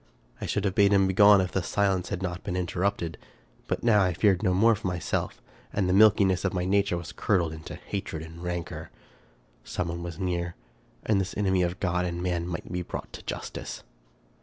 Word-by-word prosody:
I - - -3
should 105 -1 -1
have 95 - +1
bade 100 0 +4
him 100 -1 +5
begone 100 +1 +6
if 90 - -2
the 95 - 0
silence 95 -1 0
had 95 -2 -3
not 90 0 -4
been 90 - -3
interrupted; 90 -1 -1 0.5
but - - -2
now 110 -3 +5
I 90 -2 0
feared 95 -1 +3
no 100 -4 +2
more 110 +6 +5
for 100 - -3
myself; 90 -2 -2 0.3
and 95 -3 0
the 90 - +2
milkiness 100 -2 +5
of 95 -1 -1
my 90 0 0
nature 100 -1 +2
was 85 -1 -7
curdled 85 -6 0
into 80 0 -8
hatred 80 -5 -5
and 80 +1 -11
rancor. 90 -1 -4 0.7
Some 85 - -3
one 85 +1 -4
was 85 -1 -6
near, 85 -2 -2 0.5
and 100 -3 +3
this 95 - -5
enemy 95 -3 +2
of 90 0 -1
God 90 -1 0
and 85 -1 -3
man 85 -2 -1
might 85 -2 -3
possibly 90 - -4
be 90 - -7
brought - - -6
to - - -8
justice. - - -6
90 Hz, 210 wpm, -27 LUFS, 85-100 Hz, 0.7 s, begone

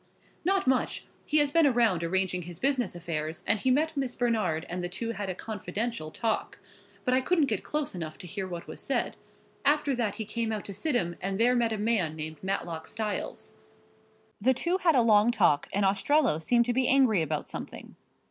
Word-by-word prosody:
"Not 385 +3 +1
much. 260 -1 0 0.2
He 305 - +2
has 290 -1 +4
been 330 -1 +5
around 230 - +2
arranging 185 +1 0
his 175 -1 -8
business 255 - 0
affairs 160 -2 -4
and 215 - +2
he 260 - +1
met 305 +5 +2
Miss 265 -3 -2
Bernard 215 -10 0
and 180 +1 -4
the 175 - -2
two 230 +5 -3
had 205 -4 -4
a 185 - -3
confidential 215 -2 -4
talk, 225 +7 -2 0.5
but 250 - +2
I 260 - +4
couldn't 325 +2 +2
get 215 -7 -2
close 300 -1 -2
enough 160 -4 -6
to 185 - -9
hear 190 +2 -4
what 175 -2 -6
was - - -5
said. - - 0 0.5
After 290 0 +2
that 230 -5 -1
he 220 - -4
came 230 +1 -2
out 215 -2 -3
to 200 - -6
Sidham 195 - 0
and 195 +1 -2
there 245 +2 +4
met 235 -2 +2
a 220 - -1
man 205 -7 +1
named 155 0 -6
Matlock 175 -4 -3
Styles." 215 -2 -3
"Go - - -27
on." - - -30 0.8
"The 260 +5 +4
two 345 +8 0
had 335 -5 +3
a 245 - +5
long 215 0 +5
talk, 175 -11 +2
and 200 0 +1
Ostrello 205 - +2
seemed 235 +7 +3
to 245 - 0
be 255 0 +2
angry 255 -9 +4
about 155 -1 -2
something. - - -8
220 Hz, 210 wpm, -28 LUFS, 180-255 Hz, 0.8 s, been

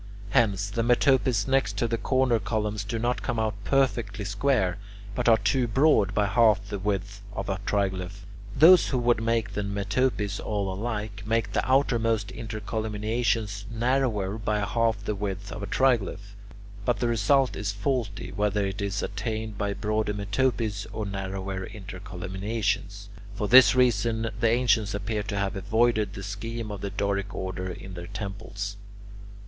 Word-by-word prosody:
Hence 100 -3 +2
the 115 - -1
metopes 125 -1 +3
next 130 -7 +1
to 120 - +1
the 115 0 -1
corner 130 -3 +2
columns 105 0 -2
do 110 +3 -3
not 120 +2 -1
come 125 -3 -2
out 110 -1 0
perfectly 115 -7 0
square, 100 -2 +1 0.3
but 110 - +1
are 115 - +7
too 120 +4 +1
broad 110 -5 +3
by 105 - +3
half 105 -1 +3
the 100 -2 -3
width 100 0 -2
of 100 +1 -4
a 95 -1 -1
triglyph. 95 -1 -1 0.3
Those 175 +3 +8
who 130 - 0
would 120 -2 +2
make 115 0 0
the 105 - -1
metopes 100 +1 -1
all 100 -3 -2
alike, 105 0 -4
make 115 0 0
the - - +1
outermost 115 -6 +2
intercolumniations 110 0 -2
narrower 115 -4 0
by 105 -1 0
half 105 0 0
the 105 - 0
width 100 -1 -4
of - - -6
a 100 - -4
triglyph. 100 -5 +1 0.5
But 120 +3 +1
the 120 - +1
result 125 +4 +2
is 100 0 -2
faulty, 105 0 -2
whether 105 0 0
it 95 +1 -4
is 100 0 -2
attained 110 +1 -4
by 100 0 -1
broader 110 -1 -1
metopes 105 0 -1
or 110 - -4
narrower 95 -1 -4
intercolumniations. 100 0 -4 0.3
For 105 0 -2
this 130 +3 +8
reason, 115 -3 +2
the 115 -1 +3
ancients 115 -3 +2
appear 105 +1 -2
to 100 -1 -4
have 100 +1 -1
avoided 110 0 +1
the 95 - -6
scheme 105 +2 -5
of 100 -2 -6
the 100 - -3
Doric 100 0 -2
order 95 0 -4
in 95 +1 -8
their 85 -1 -7
temples. 100 0 -5
105 Hz, 160 wpm, -27 LUFS, 100-115 Hz, 0.5 s, Those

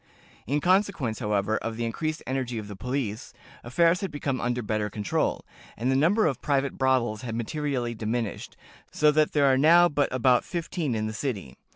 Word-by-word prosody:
_ - - -38 0.4
"In 145 +4 0
consequence, 185 - +1
however, 105 -1 0
of 115 0 -5
the 120 - -2
increased 155 +7 -3
energy 130 -2 -2
of 105 -2 -5
the 105 - -8
police, 125 -1 -4 0.3
affairs 165 +8 +2
had 195 - -2
become 145 -3 -3
under 125 0 -1
better 105 0 -1
control, 105 0 -1 0.3
and 125 +4 0
the - - +2
number 180 +11 +3
of 140 -6 -1
private 140 -1 0
brothels 125 -5 +1
had 115 -3 -5
materially 125 0 -2
diminished, 110 0 -4 0.3
so 150 0 +4
that 155 0 +2
there 145 -2 +3
are 130 -1 +4
now 170 +4 +6
but 145 -2 0
about 125 -1 +3
fifteen 165 -6 -3
in 110 0 -1
the 110 - -3
city. 110 - -4
130 Hz, 190 wpm, -26 LUFS, 110-150 Hz, 0.4 s, now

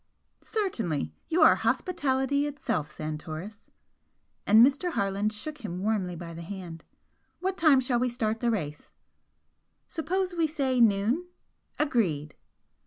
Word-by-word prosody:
"Certainly! 215 - -2 0.2
you 325 0 +4
are - - +8
hospitality 270 +2 0
itself, 180 - -2
Santoris!" 155 +7 -7 0.8
and 220 +3 +8
Mr. 300 +6 0
Harland 200 +1 0
shook 295 +8 -6
him 195 -8 -5
warmly 200 -5 0
by 170 0 -8
the 165 - -8
hand 170 -2 -8 0.6
"What 380 +1 -1
time 310 -7 +5
shall 250 -2 +1
we 250 +1 +1
start 225 -2 -1
the 240 - +1
race?" 150 -10 -4 0.9
"Suppose 365 +3 -2
we 335 -2 +1
say 270 -5 0
noon?" 225 - +3 0.5
"Agreed!" 175 - 0
230 Hz, 125 wpm, -28 LUFS, 180-295 Hz, 0.9 s, are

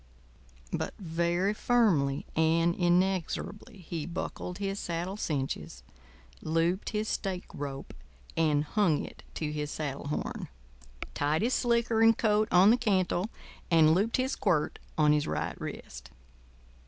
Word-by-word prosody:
But - - -2
very 175 +2 0
firmly 190 - +2
and 165 +1 +3
inexorably 185 +3 -1
he 160 -3 -4
buckled 180 0 -5
his 195 0 -3
saddle 175 +3 -3
cinches, 130 - -3 0.6
looped 165 +4 0
his 215 0 -2
stake 190 -4 -2
rope 140 -1 -6 0.4
and 150 -3 +2
hung 165 -1 +1
it - - -12
to 150 -2 -2
his 150 -1 -3
saddle 145 -2 -4
horn, 150 - -3 0.7
tied 150 +6 +1
his 245 +3 +1
slicker 235 -2 +2
and 225 0 +6
coat 215 -1 +2
on 185 +4 +7
the 240 - +4
cantle, 195 -3 +1 0.4
and 160 -2 +6
looped 205 +6 +1
his 260 +1 0
quirt 170 -7 0 0.2
on 150 -1 +5
his 150 -1 +1
right - - -3
wrist. 60 +2 -7
175 Hz, 130 wpm, -29 LUFS, 150-205 Hz, 0.7 s, on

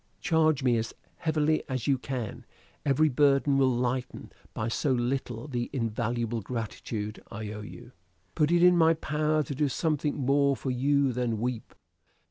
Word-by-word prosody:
Charge 155 -5 +2
me 120 -2 +3
as 115 0 -3 0.2
heavily 155 -2 +1
as 130 -4 -2
you 135 -2 +2
can; 125 -5 -5 0.4
every 145 +2 +3
burden 140 0 +3
will 135 -1 +4
lighten, 125 +1 -2 0.2
by 110 - -2
so 135 +4 0
little, 125 0 -1
the 120 -4 -3
invaluable 115 -1 -2
gratitude 110 -1 -5
I 105 0 -6
owe 105 0 -6
you. 120 +3 -11 0.4
Put 150 -1 +2
it 175 0 +4
in 180 0 +7
my 165 -1 +5
power 155 0 0
to 140 - -5
do 145 +1 0
something 150 +1 -1
more 140 +1 +2
for 130 - -3
you 140 +1 +2
than 120 -3 -1
weep." 120 0 -4
130 Hz, 160 wpm, -28 LUFS, 120-150 Hz, 0.4 s, in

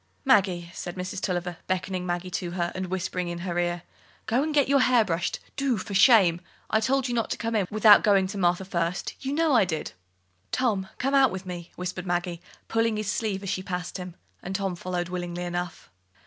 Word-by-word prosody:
"Maggie," 185 -9 +3
said 175 -1 -6
Mrs. 185 +1 -4
Tulliver, 180 -2 -2
beckoning 185 0 -2
Maggie 175 +1 -3
to 175 0 -3
her, 175 -1 -1
and 185 0 -4
whispering 180 0 -2
in 175 0 -4
her 175 -1 -1
ear, 175 0 -1 0.4
"go 230 +4 +2
and 310 +2 -1
get 290 -3 +3
your 280 0 +4
hair 250 -3 +4
brushed, 170 -1 -1 0.2
do, 275 -4 +1
for 200 +1 -6
shame! 190 -5 +6 0.3
I 220 - +4
told 265 +4 +1
you 245 - -2
not 230 -2 0
to - - -2
come 230 +1 -3
in 200 -4 +1
without 215 -1 +7
going 200 -2 +4
to 200 0 -5
Martha 175 +1 +2
first; 170 -1 -2
you 270 - -2
know 315 0 +2
I 235 - +6
did." 165 -4 -3 0.6
"Tom, 215 -7 0
come 270 +2 -1
out 270 -2 +6
with 190 0 -6
me," 175 -2 -7
whispered 180 +1 -5
Maggie, 175 -1 -1 0.3
pulling 225 -1 +1
his 210 -1 -1
sleeve 205 -3 -2
as 195 - -2
she 185 - -2
passed 180 -1 -4
him; 180 -1 -7 0.3
and 190 +1 -5
Tom 195 -2 -1
followed 175 0 -3
willingly 175 -1 -4
enough. 175 -1 -5
185 Hz, 210 wpm, -26 LUFS, 175-220 Hz, 0.6 s, without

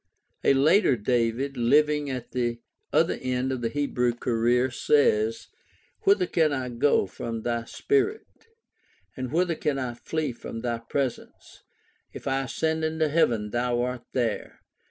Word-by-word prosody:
A 140 - +4
later 155 +3 +4
"David," 120 +4 0
living 150 +4 +3
at 125 -3 -5
the 120 -2 -1 0.3
other - - +2
end 130 0 -1
of 130 -2 -3
the 115 - 0
Hebrew 125 -3 0
career, 120 +2 +1
says: 115 -5 +2 0.6
Whither 200 -2 +4
can 160 -3 +2
I 130 -3 -2
go 120 -1 +2
from 110 +4 -6
thy 120 -1 -1
spirit? 420 - 0 0.9
And 130 -2 -5
whither 170 +2 +2
can 150 -3 -1
I 125 -3 -3
flee 155 +5 -3
from 115 -1 -7
thy 120 -1 -2
presence? 130 +2 -5 0.5
If - - -8
I 135 0 +1
ascend 160 +4 -1
into 160 0 0
heaven, 115 -9 +1
thou 120 0 0
art 125 -1 -4
there. 120 -4 -2
130 Hz, 145 wpm, -26 LUFS, 120-150 Hz, 0.9 s, A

